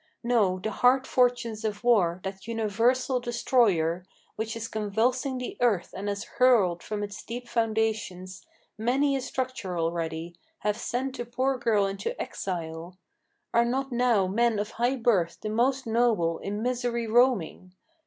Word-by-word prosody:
No: 220 -6 +2
the 215 +4 -3
hard 255 +4 +3
fortunes 240 -4 +1
of 210 0 -3
war, 185 -7 +3
that 190 +1 -6
universal 230 +4 +1
destroyer, 225 -9 +1 0.3
Which 220 +1 -3
is 230 0 -4
convulsing 230 +6 0
the 250 - -5
earth 215 -8 +1
and 200 +2 -3
has 200 +1 -3
hurled 220 -10 +3
from 210 -1 -4
its 205 0 -6
deep 240 +1 -6
foundations 220 -5 -1 0.4
Many 270 +5 +2
a 270 - -1
structure 250 -9 -3
already, 165 0 -2 0.3
have 210 -1 0
sent 260 +3 -3
the 240 - -2
poor 255 +3 0
girl 215 -4 +2
into 200 - -4
exile. 170 -1 -5 0.6
Are 235 - +5
not 265 +3 -1
now 240 -5 +3
men 225 +4 +1
of 210 +1 -2
high 245 +3 0
birth, 215 -9 +1
the 215 - -4
most 255 +5 +1
noble, 220 -8 +1
in 205 +2 -4
misery 245 -1 -1
roaming? 220 -6 +1
225 Hz, 150 wpm, -27 LUFS, 195-245 Hz, 0.6 s, Are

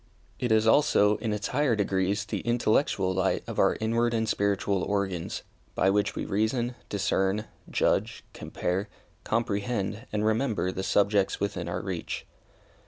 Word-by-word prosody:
It 125 -2 -1
is, 110 0 +4
also, 110 -5 +4
in 115 - -3
its 105 -1 -2
higher 140 -3 +2
degrees, 100 0 0
the - - -3
intellectual 110 -5 +1
light 95 +1 0
of - - -5
our - - +3
inward 115 +2 +1
and 110 -1 0
spiritual 100 -1 +1
organs, 95 -4 -2 0.3
by 95 - +3
which 105 +1 +1
we - - -3
reason, 120 +4 0 0.2
discern, 100 +1 0 0.2
judge, - - 0
compare, 95 +4 -3 0.3
comprehend 110 0 -1
and 105 0 0
remember 110 -4 +1
the 95 - -4
subjects 100 0 +2
within 95 -4 -2
our 85 - -2
reach. 95 -3 -4
105 Hz, 145 wpm, -28 LUFS, 95-115 Hz, 0.3 s, is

